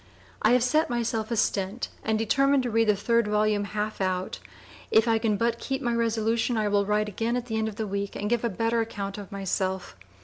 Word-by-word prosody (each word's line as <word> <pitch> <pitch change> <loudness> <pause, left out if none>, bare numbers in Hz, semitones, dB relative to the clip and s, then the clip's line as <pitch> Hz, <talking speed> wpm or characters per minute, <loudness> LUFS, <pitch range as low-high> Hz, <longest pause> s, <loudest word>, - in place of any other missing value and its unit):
I - - +4
have 250 -1 +4
Set 305 +6 +2
myself 230 -2 -1
a 235 - 0
Stent 205 +1 -1
and 220 0 +1
determine 275 +5 +3
to 245 - -2
read 225 0 +3
the 210 - +5
3d 230 +2 +1
volume 210 -1 +1
Half 210 0 -3
out. 185 -1 -1 0.5
If 220 +2 +4
I 225 -1 +3
can 215 -2 +1
but 235 +1 0
(p. - - -8
004) - - -7
keep 270 0 -1
my 240 -1 0
resolution 230 +1 +1
I 215 -1 +1
will 200 -1 +2
write 210 0 +1
again 225 +4 -1
at 245 - -4
the 220 -2 -3
end 220 - 0
of 215 - -5
the 220 - -3
week 200 0 -3
and 205 - -3
give 235 +1 0
a 235 - +1
better 230 +3 0
account 200 -3 -4
of 205 0 -9
myself. 190 - -2
220 Hz, 240 wpm, -27 LUFS, 205-235 Hz, 0.5 s, the